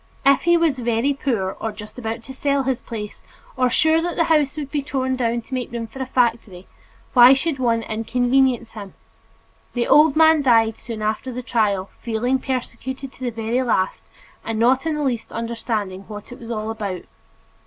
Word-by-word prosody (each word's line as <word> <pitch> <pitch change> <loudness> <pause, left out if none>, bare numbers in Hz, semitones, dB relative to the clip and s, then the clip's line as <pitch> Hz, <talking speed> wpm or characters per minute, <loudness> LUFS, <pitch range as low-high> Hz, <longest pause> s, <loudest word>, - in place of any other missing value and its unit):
If 275 -1 +5
he 345 0 +5
was 320 -6 +1
"very 240 +3 +1
poor," 225 -9 -2
or 225 - -2
"just 210 +3 -10
about 230 -1 -4
to 265 - -9
sell 280 0 0
his 260 -1 -1
place," 210 -3 -7 0.3
or 255 -1 +2
"sure 315 +5 +3
that 345 +1 -2
the 330 - +3
house 295 -2 +2
would 285 -2 -5
be 295 - 0
torn 260 -2 -1
down 235 -2 0
to 245 - -12
make 255 -2 -3
room 235 -1 -4
for 265 +4 -9
a 260 - -3
factory," 230 -8 0 0.5
why 250 +1 +9
should 275 +1 -1
one 230 -2 +1
"inconvenience" 245 +2 +1
him? 205 -3 -9 0.8
The 240 -1 +1
old 300 -1 +6
man 320 -1 +6
died 225 -4 +3
soon 220 -2 -6
after 215 +4 -2
the 250 +1 -6
trial, 205 -6 0
feeling 245 +3 0
persecuted 260 +1 -4
to 260 - -12
the 250 - 0
very 230 +2 -1
last 220 -7 0 0.4
and 225 -1 -3
not 255 +6 +3
in 315 - 0
the 300 - -2
least 245 -5 -2
understanding 225 -4 -3
what 210 0 -9
it 245 - -10
was 230 - -10
all 220 -1 -3
about. 200 -5 -4
245 Hz, 195 wpm, -21 LUFS, 225-265 Hz, 0.8 s, why